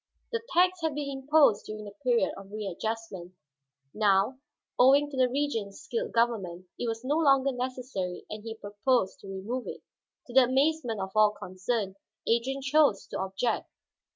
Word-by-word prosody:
The 460 -1 -1
tax 365 0 +4
had 320 -3 -1
been 285 -1 -3
imposed 270 -4 +3
during 215 0 -6
the 205 - -8
period 245 -2 +2
of 195 0 -11
readjustment; 210 -2 -5 0.6
now, 210 +4 +2 0.4
owing 280 +3 +6
to - - -6
the 255 -1 +3
Regent's 240 -7 -2
skilled 255 -3 -3
government, 200 -7 0
it 240 - -2
was 225 +1 -3
no 290 +4 +1
longer 275 -3 +4
necessary 250 -8 -4
and 215 0 -7
he 225 -1 -6
proposed 205 0 0
to - - -12
remove 200 +7 -4
it. - - -7 0.4
To 245 - -11
the 260 0 +7
amazement 265 -3 +1
of 190 0 -4
all 215 0 +6
concerned, 195 +1 -3 0.3
Adrian 260 +4 +1
chose 285 -7 +3
to - - -4
object. 195 +5 -1
235 Hz, 160 wpm, -28 LUFS, 205-270 Hz, 0.6 s, the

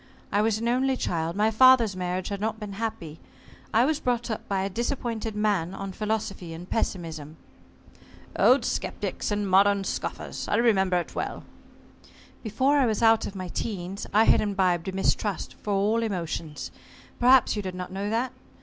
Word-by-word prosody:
I 205 - +2
was 220 0 +1
an 230 +1 -2
only 260 +2 +1
child. 165 -4 -2
My 215 +2 +2
father's 235 -3 +6
marriage 180 0 -3
had 200 -1 -4
not 220 +1 -2
been 210 -2 -6
happy. 195 -7 -5 0.5
I 230 +3 +4
was 310 +1 0
brought 240 -3 -1
up 220 - -5
by 195 -1 0
a - - 0
disappointed 230 0 -3
man 200 -4 0
on 195 0 -5
philosophy 210 -4 -3
and 175 +2 -9
pessimism." 160 -8 -3 1.0
"Old - - +4
sceptics, - - -3
and 205 -1 -1
modern 200 +1 +4
scoffers. - - -4
I - - +1
remember 195 -6 +3
it 175 - -4
well." - - -4 1.0
"Before 260 +6 +1
I 265 - +3
was 220 +1 -1
out 225 0 +4
of 200 - -8
my 185 -2 -5
teens, 190 -1 -4
I 215 +2 +5
had - - +4
imbibed 190 -4 0
a - - -1
mistrust 195 +1 -1
for 210 - -3
all 210 +4 +2
emotions. 170 -7 -4 0.5
Perhaps 255 0 +5
you 210 - -2
did 185 -2 -5
not 180 0 -6
know 195 +2 -3
that? 240 +3 -1
205 Hz, 175 wpm, -26 LUFS, 185-225 Hz, 1.0 s, father's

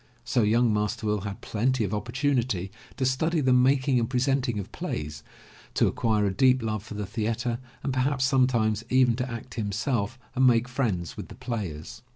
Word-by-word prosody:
So 120 +1 +2
young 115 +2 +3
Master 105 +1 -1
Will 105 -1 0
had 100 0 -6
plenty 120 +2 0
of 100 0 -2
opportunity 120 -4 -1 0.3
to 130 - 0
study 160 +6 +1
the 130 -3 +3
making 130 0 +3
and 115 - -1
presenting 130 -2 +1
of 100 - -5
plays, 75 -1 -5 0.5
to - - +4
acquire 110 -3 +1
a 100 - 0
deep 130 +1 +4
love 110 -2 -2
for 105 - -9
the 105 0 -3
theatre 115 +3 -2 0.2
and 135 0 -1
perhaps 130 0 +1
sometimes 120 -5 +2
even 130 -2 +4
to 125 0 -2
act 115 +1 -7
himself 110 +2 -1 0.2
and 130 0 +4
make 120 0 +4
friends 110 - -2
with - - -6
the - - -11
players. 100 -6 -5
120 Hz, 185 wpm, -27 LUFS, 105-130 Hz, 0.5 s, to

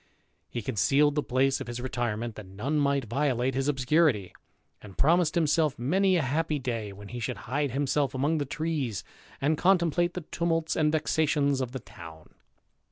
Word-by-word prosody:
He 120 - -5
concealed 135 - +2
the 150 - 0
place 135 0 +1
of - - -6
his 120 0 -5
retire 120 -3 -2
ment, 115 0 -4
that 105 -2 -10
none 120 +11 -2
might 140 -2 +1
violate 130 +1 0
his 135 +2 -1
obscurity; 135 - +2 0.5
and 100 -3 -13
promised 165 +2 +3
himself 155 -2 +2
many 185 +10 +2
a 165 - +2
happy 150 +3 0
day 115 -6 -3
when 100 +1 -11
he 120 - -6
should 110 - -3
hide 140 +4 -1
himself 135 +1 0
among 150 +5 +1
the 145 - -1
trees, 145 - -2 0.4
and 150 +3 +1
contemplate 175 -2 +2
the 180 - -3
tumults 165 -1 0
and 150 -1 +2
vexations 150 -3 +1
of 125 -2 -3
the 130 - -5
town. 85 -7 -13
140 Hz, 175 wpm, -28 LUFS, 120-155 Hz, 0.5 s, promised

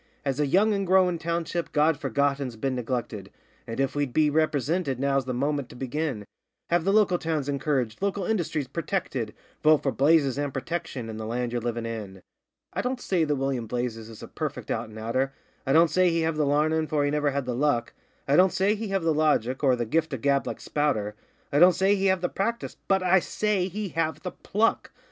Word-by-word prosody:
'As 135 0 -1
a 150 - +2
young 205 +9 +3
and 195 -2 -1
growin' 180 -2 +3
township 170 +1 -2
God 150 +1 +3
Forgotten's 140 -2 -1
been 130 +4 -2
neglected, 120 -5 -4 0.4
And, 115 +2 -5
if 135 0 +1
we'd 145 -4 -2
be 155 -1 +3
ripresinted, 155 -1 0
now's 135 0 +1
the 130 - -3
moment 140 0 -1
to - - -12
begin 130 -3 -3 0.5
Have 175 -1 +2
the 195 - +3
local 200 -4 +3
towns 155 -4 -2
encouraged, 140 -4 -1
local 200 -1 -1
industries 165 -9 -1
purtected: 150 - -3 0.3
Vote 155 -1 +4
for 135 - +1
Blazes, 140 +1 +3
and 145 -1 -1
Protection, 135 -3 -4
and 110 -1 -6
the 110 - -5
land 120 +1 -2
ye're 120 0 -2
livin' 120 0 -3
in. 105 -5 -6 0.5
'I - - -1
don't 250 +1 -2
say 180 -8 +1
that 150 -1 0
William 135 -4 -2
Blazes 115 -1 -3
is 110 - -11
a - - -7
perfect - - -5
out - - -2
an' 110 - -11
outer, 130 +5 -1 0.3
I - - +2
don't 165 0 +5
say 185 +2 +4
he 165 0 +1
have 160 0 0
the 150 -2 +1
larnin', 155 +2 +2
for 150 -2 +1
he 145 - 0
never 150 -1 +1
had 140 -1 -2
the 125 - -2
luck; 120 -2 0 0.3
I 140 - +3
don't 185 +3 +6
say 195 +2 +2
he 220 +1 -4
have 195 -2 -1
the 165 -1 +2
logic, 145 -4 +1
or 130 -2 +4
the 120 -1 -2
gift 160 +6 0
of 130 - -4
gab, 140 -1 +2
like - - -4
Spouter, 130 -9 -1 0.4
I 145 - +4
don't 180 +2 +7
say 195 +1 +3
he 195 -1 +1
have 190 -1 +2
the 180 - +1
practice 230 +6 -3
BUT 190 -1 +2
I 185 +1 +5
SAY 200 0 0
HE 200 +2 -4
HAVE 165 -1 -2
THE 180 - -4
PLUCK! 220 +3 0
145 Hz, 220 wpm, -26 LUFS, 130-175 Hz, 0.5 s, don't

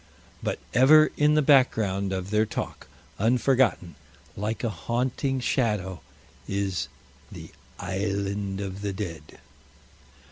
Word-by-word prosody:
But - - -2 0.2
ever 155 +5 +6
in 150 +1 +3
the 155 - +3
background 110 -9 +3
of 95 +1 -4
their 110 +1 +2
talk, - - -5 0.3
unforgotten, 120 -5 +2 0.4
like 110 +3 -3
a 120 - +1
haunting 125 - -1
shadow, 105 - -1 0.5
is 100 -2 -2 0.4
the - - -10 0.3
"Island 100 +1 -2
of 100 0 -5
the 100 -1 -2
Dead." 85 -6 -7
105 Hz, 110 wpm, -26 LUFS, 95-125 Hz, 0.5 s, ever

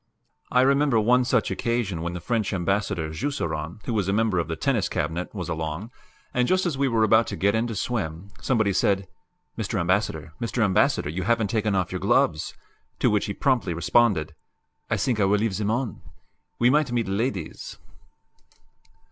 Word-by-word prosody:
I 125 - +4
remember 140 -2 +3
one 125 +4 +4
such 125 -3 +1
occasion 115 -8 -1
when 85 +1 -3
the 90 - -4
French 110 +3 -1
Ambassador, 95 -3 -1
Jusserand, 80 - -3
who 120 - -2
was 100 -4 0
a - - +1
member 105 -4 +2
of 85 - -1
the 80 - -3
Tennis 125 - 0
Cabinet, 80 +4 -2
was 90 -3 -4
along, 80 +6 -4 0.4
and, 125 0 +2
just 185 0 +2
as 170 -5 0
we 135 0 +1
were 115 -3 +2
about 110 +1 +4
to - - -4
get 100 +1 +2
in 110 +1 +1
to 115 - -5
swim, 95 -4 -3
somebody 110 -6 +1
said, 95 +1 +1 0.5
"Mr. 105 -1 -2
Ambassador, 85 -4 -1
Mr. 115 0 0
Ambassador, 95 -6 +2
you 90 +4 -3
haven't 110 0 +1
taken 110 -3 0
off 95 -1 0
your 90 - -3
gloves," 75 - +1 0.4
to - - +2
which 105 -1 +1
he 100 - -2
promptly 120 -11 +1
responded, 85 -2 +2 0.6
"I 110 - +1
think 110 +2 0
I 100 - +4
will 100 +2 +3
leave 105 -2 -1
them 105 -1 -1
on; 120 -1 -2 0.6
we 120 +1 +4
might 150 -2 +2
meet 120 -3 0
ladies!" 100 -3 -3
105 Hz, 185 wpm, -25 LUFS, 90-120 Hz, 0.6 s, I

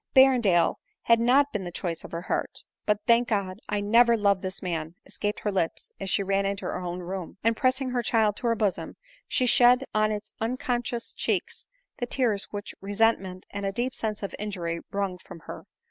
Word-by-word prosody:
Berrendale 245 -10 +5 0.3
bad 230 0 +6
not 270 +5 +4
been 210 -3 -2
the 175 - -5
choice 170 -1 -3
of - - -10
her 170 +1 -4
heart. - - -3
" - - -64
But, 210 -1 +2
thank 235 0 +4
God! 195 -4 -1
I 205 0 0
never 230 +3 +5
loved 200 -3 +2
this 190 +1 -1
man," 165 -2 -3
escaped 205 0 -3
her 210 - -1
lips 180 -4 -2
as 195 - -3
she 200 - +2
ran 195 0 +1
into 195 0 -2
her - - -2
own 180 0 -4
room; 180 0 -6
and 230 +1 +3
pressing 255 +1 +1
her 245 -1 0
child 220 -2 +2
to - - -8
ber 230 - +3
bosom, 210 -4 -1 0.3
she 255 - +1
shed 245 +1 +6
on 215 0 +2
its 215 0 -5
uncon 245 +1 -1
scious 240 0 -5
cheeks - - -2 0.3
the 245 - -2
tears 230 -6 +1
which 205 0 -7
resentment 195 -2 0
and 200 0 -5
a 195 - 0
deep 240 +5 -2
sense 215 -2 -3
of 200 - -4
injury 175 -5 -3
wrung 195 -2 -2
from 170 - -12
her. - - -9
210 Hz, 210 wpm, -27 LUFS, 190-235 Hz, 0.3 s, bad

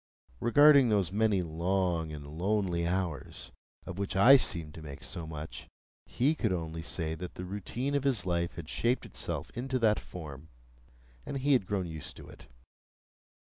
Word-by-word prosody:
Regarding 140 0 +6
those 100 -5 +2
many 105 -2 +2
long 85 0 0
and 75 -2 -7
lonely 85 +2 0
hours 85 -6 -3 0.3
of 90 +1 -6
which 100 -2 -2
I 120 +8 +9
seemed 85 - +1
to 80 - -10
make 70 -3 -9
so 85 -2 -5
much, 75 0 -7 0.4
he 140 +6 +2
could 115 -10 -1
only 80 -2 -3
say 80 -1 -2
that 90 +2 -7
the 90 - -6
routine 105 +8 -3
of 140 -1 +1
his 130 -8 +1
life 85 -1 -1
had 80 -3 -7
shaped 120 +9 0
itself - - -5
into 130 +2 -2
that 110 -3 +3
form, 80 -3 -9 0.7
and 140 - -4
he 140 +2 +2
had 120 -8 +2
grown 100 -3 -1
used 80 -3 -7
to - - -11
it. - - -14
90 Hz, 170 wpm, -31 LUFS, 80-115 Hz, 0.7 s, I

